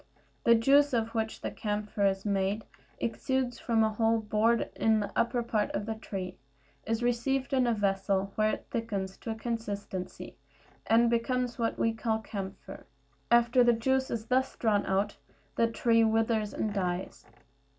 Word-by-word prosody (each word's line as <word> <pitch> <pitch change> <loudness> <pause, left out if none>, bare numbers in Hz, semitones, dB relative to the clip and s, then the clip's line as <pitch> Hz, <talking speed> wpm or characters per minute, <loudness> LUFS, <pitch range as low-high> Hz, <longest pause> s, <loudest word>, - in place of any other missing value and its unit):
The 235 - +7
juice 275 +5 +4
of 225 -1 +1
which 220 -1 -2
the - - -3
camphire 210 -1 -1
is 195 +1 -1
made 200 +1 0 0.3
exudes 255 +1 -1
from 225 -2 +2
a 220 0 +1
hole 225 +1 +2
bored 220 +2 +1
in 220 -1 +3
the 205 - -3
upper 240 +1 +1
part 215 -3 0
of 205 - -2
the 220 - -2
tree, 195 -4 -6 0.5
is 225 +1 -1
received 260 +3 0
in 255 -2 +3
a 235 - +3
vessel, 195 -1 0
where 215 0 +2
it - - -5
thickens 200 -4 -3
to - - -8
a 220 - -2
consistency, 205 -5 -5 0.5
and 230 +1 +5
becomes 245 +1 0
what 230 -1 0
we 225 - +1
call 225 0 -1
camphire. 200 -3 -8 0.4
After 235 +1 +5
the 240 0 +5
juice 265 +3 +1
is 220 -2 -3
thus 260 +2 +1
drawn 210 -3 +1
out 195 +2 0 0.4
the 230 - +3
tree 230 0 +3
withers 220 -1 +1
and 215 -2 -2
dies. 180 -2 -3
225 Hz, 165 wpm, -29 LUFS, 205-235 Hz, 0.5 s, The